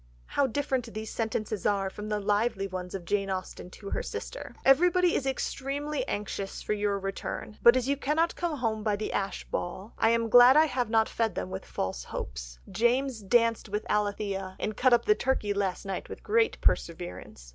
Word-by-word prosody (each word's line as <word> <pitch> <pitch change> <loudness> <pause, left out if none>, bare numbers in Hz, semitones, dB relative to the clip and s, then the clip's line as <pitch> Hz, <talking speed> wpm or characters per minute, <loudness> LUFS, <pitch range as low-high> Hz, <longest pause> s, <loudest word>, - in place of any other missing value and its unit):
How 280 - +1
different 260 -2 -1
these 220 0 -5
sentences 220 -2 -2
are 195 -2 +1
from 210 +2 -7
the 210 -1 0
lively 205 0 +1
ones 185 -1 -5
of 180 -3 -6
Jane 195 +2 0
Austen 185 -1 -5
to 200 +2 -9
her - - -1
sister: - - -6
"Everybody 355 +5 +5
is 270 - 0
extremely 280 +2 -2
anxious 200 -1 -4
for - - 0
your 205 -1 0
return, 195 +2 -5
but 235 +2 +7
as 255 0 -1
you 280 - +2
cannot 305 +5 +1
come 340 -3 -2
home 225 -4 -1
by 210 -1 +1
the 215 - -4
Ashe 195 -1 -2
ball, 190 +5 -4
I 225 - +4
am 230 0 +2
glad 245 +4 +8
I 310 - +7
have 250 -6 -1
not 225 -1 +3
fed 225 -2 -1
them 185 - -4
with 190 0 -5
false 95 -10 -3
hopes. - - -6
James 240 +4 +1
danced 230 +2 +2
with 210 +2 -2
Alithea, 200 -2 -1
and 215 - -2
cut 255 +4 +3
up 240 - +4
the 425 - +6
turkey 260 - 0
last 195 -2 -2
night 195 -1 -4
with - - -9
great 445 +1 +2
perseverance. 170 - -2
215 Hz, 195 wpm, -28 LUFS, 195-260 Hz, -, glad